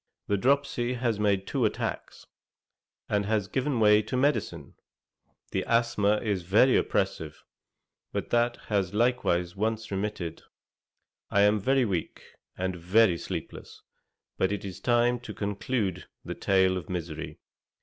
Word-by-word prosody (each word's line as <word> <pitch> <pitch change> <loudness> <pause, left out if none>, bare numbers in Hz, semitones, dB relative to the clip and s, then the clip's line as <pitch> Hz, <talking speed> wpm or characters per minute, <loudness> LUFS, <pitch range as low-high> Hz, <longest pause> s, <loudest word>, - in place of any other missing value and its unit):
The 100 - +1
dropsy 125 +1 +1
has 120 -3 -1
made 100 -2 +1
two - - -1
attacks, - - -3 0.8
and 100 -1 0
has 105 -3 0
given 130 +2 -1
way 105 -1 +6
to 110 +4 -3
medicine; 145 +3 -1 0.8
the - - -1
asthma 115 -3 +2
is 100 -4 -1
very 105 +9 +4
oppressive, - - -1 0.7
but - - -4
that 120 0 +2
has 100 -2 0
likewise 105 -7 +1
once 110 +2 -2
remitted. 95 -4 -3 0.9
I 100 - +3
am 105 +1 +4
very 130 +5 +2
weak, 90 -6 -3 0.3
and 95 0 -2
very 90 +1 +3
sleepless; 85 -4 -7 0.6
but 95 - +2
it 105 -1 -3
is 95 -2 -7
time 120 0 +2
to 110 -4 -9
conclude 100 -2 -2 0.2
the - - -4
tale 95 -1 +2
of 90 - -7
misery. 85 -3 -5
105 Hz, 135 wpm, -28 LUFS, 95-120 Hz, 0.9 s, way